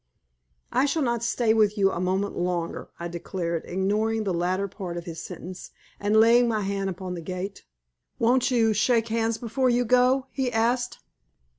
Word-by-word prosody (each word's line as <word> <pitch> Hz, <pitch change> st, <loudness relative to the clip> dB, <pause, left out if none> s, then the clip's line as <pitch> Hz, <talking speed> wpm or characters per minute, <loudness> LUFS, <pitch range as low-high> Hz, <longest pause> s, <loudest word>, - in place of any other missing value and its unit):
"I 275 Hz, -, +3 dB
shall 295 Hz, +2 st, 0 dB
not 235 Hz, -2 st, 0 dB
stay 235 Hz, -1 st, +2 dB
with 215 Hz, -1 st, +3 dB
you 195 Hz, -1 st, +3 dB
a -, -, -3 dB
moment 190 Hz, +2 st, -1 dB
longer," 175 Hz, -1 st, -2 dB
I 170 Hz, -, -3 dB
declared, 170 Hz, -1 st, -4 dB
ignoring 210 Hz, +4 st, 0 dB
the 195 Hz, -3 st, -1 dB
latter 185 Hz, +3 st, 0 dB
part 180 Hz, -3 st, -6 dB
of 170 Hz, -, -6 dB
his 165 Hz, -2 st, -6 dB
sentence, 185 Hz, +1 st, -8 dB, 0.3 s
and 210 Hz, +2 st, +3 dB
laying 235 Hz, +2 st, +6 dB
my 220 Hz, -2 st, 0 dB
hand 195 Hz, 0 st, -2 dB
upon 185 Hz, 0 st, -5 dB
the 175 Hz, -, -5 dB
gate. 185 Hz, +3 st, -6 dB, 0.5 s
"Won't 245 Hz, +3 st, +3 dB
you 230 Hz, -3 st, +3 dB
shake 225 Hz, +2 st, +2 dB
hands 225 Hz, 0 st, 0 dB
before 250 Hz, +2 st, 0 dB
you 245 Hz, 0 st, +2 dB
go?" 255 Hz, +3 st, +3 dB
he 260 Hz, -3 st, -1 dB
asked. 240 Hz, +2 st, 0 dB
215 Hz, 175 wpm, -26 LUFS, 185-235 Hz, 0.5 s, laying